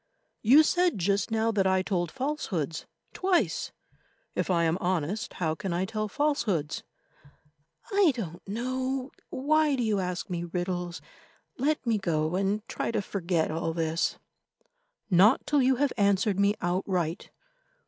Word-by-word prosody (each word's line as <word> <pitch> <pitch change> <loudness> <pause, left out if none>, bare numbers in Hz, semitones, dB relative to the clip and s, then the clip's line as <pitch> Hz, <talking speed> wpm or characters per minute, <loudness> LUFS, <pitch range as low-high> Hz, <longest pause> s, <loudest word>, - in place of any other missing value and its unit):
"You 270 +8 +7
said 355 - +2
just 195 +2 +1
now 225 0 +1
that 195 -3 +2
I 190 0 +2
told 175 -3 -1
falsehoods—twice; 270 - -2 0.6
if - - -2
I 170 -2 +3
am 165 +2 +1
honest, 185 +3 -1
how 160 -3 -1
can 190 0 -4
I 180 +2 0
tell 215 +1 -3
falsehoods?" 210 - 0 1.1
"I 395 -5 +5
don't 175 -8 -5
know. 255 +4 -2 0.2
Why 300 +2 +2
do 250 - -1
you 215 -3 +1
ask 180 0 -3
me 175 -3 -3
riddles? 175 0 -3 0.6
Let 295 +2 0
me 225 -3 +1
go 160 -3 0
and 200 +3 -1
try - - -3
to 230 - 0
forget 175 -5 -1
all 165 +1 -2
this." 165 0 0 0.9
"Not 195 +8 +5
till 290 -2 +3
you 260 +1 +4
have 280 +1 +1
answered 200 -1 +2
me 200 +1 +3
outright. 175 -2 -1
200 Hz, 140 wpm, -28 LUFS, 175-255 Hz, 1.1 s, You